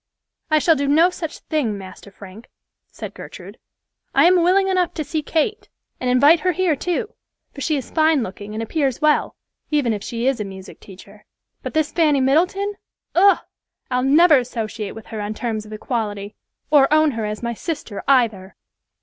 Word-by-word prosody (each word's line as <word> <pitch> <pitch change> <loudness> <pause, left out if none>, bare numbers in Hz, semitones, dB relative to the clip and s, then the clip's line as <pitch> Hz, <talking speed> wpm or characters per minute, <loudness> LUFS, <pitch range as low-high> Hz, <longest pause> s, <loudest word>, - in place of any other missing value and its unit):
"I 310 - +4
shall 320 +2 +4
do 280 -1 -1
no 325 +6 +4
such 325 -3 -6
thing, 260 -10 -1
Master 190 +1 -11
Frank," 200 +3 -13 0.4
said - - -9
Gertrude. - - -11 0.6
"I 275 +3 +6
am 360 0 +5
willing 380 +3 +3
enough 365 -2 0
to 310 - -2
see 305 +2 -3
Kate, 340 +9 -2 0.3
and 255 - -1
invite 285 +7 +5
her 365 +2 0
here 355 -3 +1
too, 405 - -3 0.4
for 280 - -9
she 300 +2 0
is 265 - -7
fine 315 -4 +3
looking 205 +1 -8
and 225 - -3
appears 270 +1 -1
well, 305 -1 +2 0.3
even 285 -7 +1
if 205 -1 -5
she 235 0 -4
is 265 -2 +1
a - - -1
music 190 -1 -10
teacher; 190 -2 -15 0.4
but - - -7
this 310 -1 +1
Fanny 305 -5 +2
Middleton—Ugh! 380 +6 +1 0.5
I'll 250 0 +1
never 300 +2 +6
associate 225 -4 -5
with 225 - -10
her 220 -2 -6
on 210 +1 -4
terms 220 -3 -4
of - - -13
equality, 210 -2 -4 0.4
or 285 -2 +5
own 310 0 +4
her 225 -3 -3
as 210 +2 -5
my 235 0 -2
sister 235 - -5
either." 225 -8 +2
275 Hz, 180 wpm, -21 LUFS, 220-320 Hz, 0.6 s, I